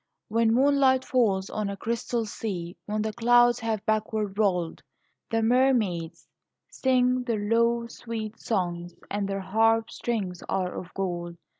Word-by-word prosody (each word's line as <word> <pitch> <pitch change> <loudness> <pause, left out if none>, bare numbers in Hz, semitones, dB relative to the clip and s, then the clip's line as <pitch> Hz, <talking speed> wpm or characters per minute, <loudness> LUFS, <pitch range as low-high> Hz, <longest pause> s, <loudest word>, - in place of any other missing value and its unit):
When 225 +1 +3
moonlight 265 -1 +4
falls 200 -7 +1
on 210 -1 -2
a 200 - -5
crystal 235 +1 -2
sea, 185 -5 -5
When 210 0 -1
the 220 -1 -2
clouds 240 +1 +4
have 220 -3 -2
backward 215 -2 -1
rolled, 180 -6 0 0.5
The 225 0 +1
mermaids 220 -10 +1 0.4
sing 255 -1 +2
their 235 -3 -1
low 235 +1 +2
sweet 225 -2 -6
songs, 175 -4 -2 0.2
And 200 0 -1
their 195 0 -2
harp 225 +4 +2
strings 195 -7 -3
are 185 -2 -1
of 180 0 -7
gold. 175 -3 -3
220 Hz, 140 wpm, -27 LUFS, 190-235 Hz, 0.5 s, moonlight